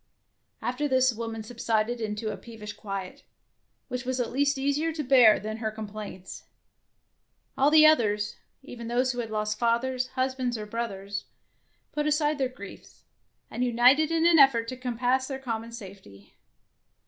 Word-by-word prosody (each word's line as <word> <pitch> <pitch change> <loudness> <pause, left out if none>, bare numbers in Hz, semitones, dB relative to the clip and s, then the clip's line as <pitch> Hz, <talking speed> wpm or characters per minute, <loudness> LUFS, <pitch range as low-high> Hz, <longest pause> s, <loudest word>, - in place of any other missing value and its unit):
After 255 +4 -1
this 260 -1 +3
the - - -10
woman 225 -1 -5
subsided 230 0 -1
into 215 0 -3
a - - -5
peevish 215 -3 -9
quiet, 195 -3 -6 0.7
which 250 -1 -4
was 255 0 -2
at 245 - -1
least 280 +2 +1
easier 285 +4 0
to 310 -1 -4
bear 250 -5 +6
than 215 +1 -5
her 220 -1 -2
complaints. 215 -3 -8 1.1
All 275 +2 +4
the 310 0 +7
others, 210 -9 +3 0.3
even 235 -4 -8
those 250 +2 +1
who 245 - -6
had 230 -2 -3
lost 215 0 -2
fathers, 250 +2 0
husbands, 260 -2 -2
or 210 - -6
brothers, 205 -3 -5 0.7
put 300 0 -1
aside 300 0 +1
their 260 -2 +1
griefs, 200 -6 -12 0.5
and 250 - -2
united 250 +6 +4
in 330 0 +1
an 340 -2 +6
effort 240 -5 +5
to 255 - -5
compass 250 +1 -1
their 270 - -4
common 230 -3 -5
safety. 195 - -12
240 Hz, 160 wpm, -27 LUFS, 215-265 Hz, 1.1 s, the